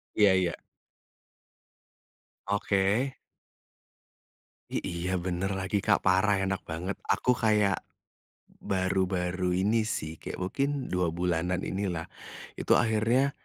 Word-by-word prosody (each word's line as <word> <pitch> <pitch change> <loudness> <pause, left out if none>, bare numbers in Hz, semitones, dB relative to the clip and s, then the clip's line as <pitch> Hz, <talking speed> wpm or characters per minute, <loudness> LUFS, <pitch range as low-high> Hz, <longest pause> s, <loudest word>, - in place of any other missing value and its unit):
Iya 105 -3 +6
iya. 90 -2 +1 1.9
Oke. 100 +5 +1 1.6
I - - -1
iya 85 +2 -3
bener 90 +2 -2
lagi 95 +1 -1
Kak 95 -4 +3
parah 95 +2 +4
enak 95 0 -2
banget 90 +5 -3
aku 100 +6 +3
kayak, 105 -4 +2 0.8
baru-baru 95 -1 0
ini 110 +2 +3
sih 80 -6 -4
kayak - - -6
mungkin 135 +10 0 0.2
2 90 -1 +2
bulanan 90 +1 0
ini 100 +1 -2
lah, 80 -2 -3 0.5
itu - - +3
akhirnya, 115 +4 +2
95 Hz, 105 wpm, -29 LUFS, 90-105 Hz, 1.9 s, Iya